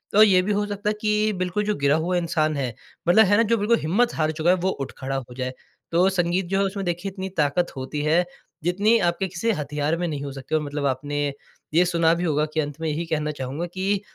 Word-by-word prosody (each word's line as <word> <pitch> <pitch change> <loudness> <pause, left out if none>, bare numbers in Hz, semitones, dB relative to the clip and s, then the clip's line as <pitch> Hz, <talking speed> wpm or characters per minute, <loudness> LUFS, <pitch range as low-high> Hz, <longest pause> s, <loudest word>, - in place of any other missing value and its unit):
और 215 - +9
ये 190 -4 +5
भी 195 +3 -1
हो 205 +1 +1
सकता 205 +1 -2
है - - +1
कि 215 0 +2
बिल्कुल 185 +3 -1
जो 210 0 0
गिरा 140 +1 +2
हुआ 175 +3 0
इंसान 160 -3 0
है 130 -4 -2 0.3
मतलब 220 +6 +7
है 205 +2 +4
ना, 230 - +5
जो 230 +1 +2
बिल्कुल 220 +3 +2
हिम्मत 215 +10 +1
हार 155 -1 +1
चुका 160 +2 0
है 180 - +6
वो 185 +1 -1
उठ 135 -7 -4
खड़ा 135 0 -3
हो 125 -2 -5
जाए। 130 0 -3 0.4
तो 175 +3 +4
संगीत 180 0 0
जो 195 - +1
है - - +3
उसमें 195 0 -3
देखिए 175 +3 -2
इतनी 190 0 -5
ताकत 155 +3 +1
होती 135 +3 -4
है 160 +4 +3 0.4
जितनी 200 +7 +3
आपके 175 +3 0
किसी 190 +6 -1
हथियार 150 - -1
में 175 +1 -1
नहीं 145 -3 -4
हो 140 - -5
सकते। 135 +3 -4
और 155 - +2
मतलब 145 -1 -3
आपने 145 +2 -1 0.5
ये 175 +3 +5
सुना 170 -2 +3
भी 170 +1 -2
होगा 150 -3 +1
कि 160 - 0
अंत 145 -1 -3
में 160 - -1
यही 155 +3 -2
कहना 155 -2 -1
चाहूँगा 140 +3 -4
कि 195 +1 0
170 Hz, 250 wpm, -24 LUFS, 150-195 Hz, 0.5 s, और